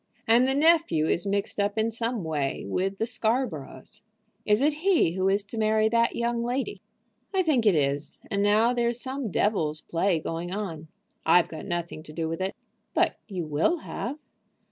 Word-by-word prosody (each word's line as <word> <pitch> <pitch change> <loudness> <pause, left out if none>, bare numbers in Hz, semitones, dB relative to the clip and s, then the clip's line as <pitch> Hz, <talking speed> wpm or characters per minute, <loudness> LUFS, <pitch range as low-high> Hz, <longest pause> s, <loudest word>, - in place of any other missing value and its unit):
And 235 +3 +5
the 265 - +1
nephew 310 - +4
is 175 +4 0
mixed 200 +1 -1
up 205 +1 0
in 220 +1 +1
some 230 -2 -2
way 150 -4 -2
with 190 - -1
the 225 - 0
Scarboroughs." 220 - -2 0.5
"Is 210 +4 +3
it 300 +1 +3
he 365 - +3
who 185 +2 +1
is 200 +1 +2
to 215 +3 -6
marry 215 0 +3
that 235 +1 +2
young 235 0 0
lady?" 260 +11 -2 0.5
"I 375 - +3
think 265 -9 +2
it 195 - +5
is. 145 0 -1
And 200 - +1
now 215 +4 +4
there's 240 -1 0
some 260 -2 -3
devil's 160 -7 0
play 170 0 0
going 165 +3 -4
on. 175 -6 -4 0.4
I've 170 +2 +4
got 160 - -7
nothing 170 -3 -3
to 155 -1 -12
do 160 0 -2
with 165 +2 -4
it." 190 +1 -2 0.4
"But - - +2
you 185 -5 -4
will 155 - +1
have." 265 +5 -4
205 Hz, 185 wpm, -27 LUFS, 165-235 Hz, 0.5 s, And